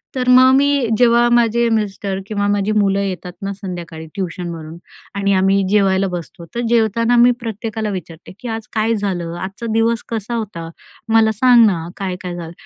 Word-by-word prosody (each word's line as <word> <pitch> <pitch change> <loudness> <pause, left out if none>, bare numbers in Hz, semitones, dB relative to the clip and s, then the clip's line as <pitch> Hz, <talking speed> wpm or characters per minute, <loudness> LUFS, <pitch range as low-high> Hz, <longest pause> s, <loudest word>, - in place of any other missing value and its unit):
तर 250 -1 -2
मग 255 +1 +7
मी 280 -2 +2
जेव्हा 240 0 +4
माझे 235 0 +3
मिस्टर 200 -3 -2
किंवा 205 -1 -1
माझी 205 0 0
मुलं 200 -2 +2
येतात 185 -2 -4
ना 195 0 -3
संध्याकाळी 175 -4 -7
ट्युशनवरून 170 -4 -5 0.4
आणि 200 0 +1
आम्ही 195 +1 +3
जेवायला 195 -1 +2
बसतो, 175 -1 -7
तर 240 - -1
जेवताना 230 +1 +2
मी 240 +1 +6
प्रत्येकाला 220 -1 -4
विचारते 175 -4 -8
की, 250 - -8
आज 225 -1 -5
काय 220 +1 +1
झालं? 180 -5 -3
आजचा 195 +5 -6
दिवस 225 0 +1
कसा 230 +1 -3
होता? 195 -7 -5 0.4
मला 220 -1 +5
सांग 240 +2 +5
ना, 170 -5 0
काय 190 -2 -3
काय 180 -1 -5
झालं? 165 -2 -7
205 Hz, 170 wpm, -18 LUFS, 185-230 Hz, 0.4 s, मग